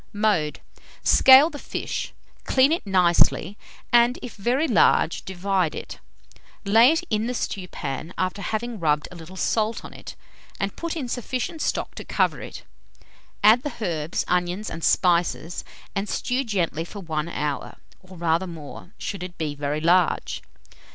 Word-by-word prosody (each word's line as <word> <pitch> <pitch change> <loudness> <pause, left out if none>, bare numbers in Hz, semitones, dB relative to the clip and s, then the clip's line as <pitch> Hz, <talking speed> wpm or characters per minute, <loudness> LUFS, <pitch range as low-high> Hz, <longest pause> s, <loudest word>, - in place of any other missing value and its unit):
Mode. 205 -8 0 0.4
Scale 270 +5 +7
the 290 - -8
fish, - - -4 0.3
clean 265 +2 +4
it 330 - -1
nicely, 180 0 +3 0.4
and, 240 +1 +5
if 245 - -7
very 245 +9 +1
large, 175 - +3
divide 190 -3 -1
it; - - -7 0.7
lay 225 +5 +6
it 325 +2 0
in 215 +2 +1
the 250 - -2
stewpan, 170 - -4
after 185 +2 -2
having 220 +2 -3
rubbed 150 -2 +1
a - - -10
little 170 +2 -11
salt 220 +4 -1
on - - -10
it, - - -10 0.4
and 195 0 -2
put 335 -1 -4
in 285 -6 -3
sufficient 255 +6 -3
stock - - -1
to - - -8
cover - - 0
it; - - -9 0.8
add 220 +4 +7
the 295 - -4
herbs, 165 -6 -2
onions, 180 +3 -1
and 165 - -6
spices, 175 -1 +1 0.3
and 200 +1 -2
stew 255 +2 -1
gently 180 - -1
for 200 +4 -9
1 160 -3 -3
hour, 150 -4 -3 0.2
or 185 -1 -14
rather 170 +2 +1
more, 165 +3 -10
should 200 -3 -5
it 180 -1 -7
be 155 -2 -2
very 145 +1 -3
large. 175 +2 +2
190 Hz, 155 wpm, -24 LUFS, 170-235 Hz, 0.8 s, Scale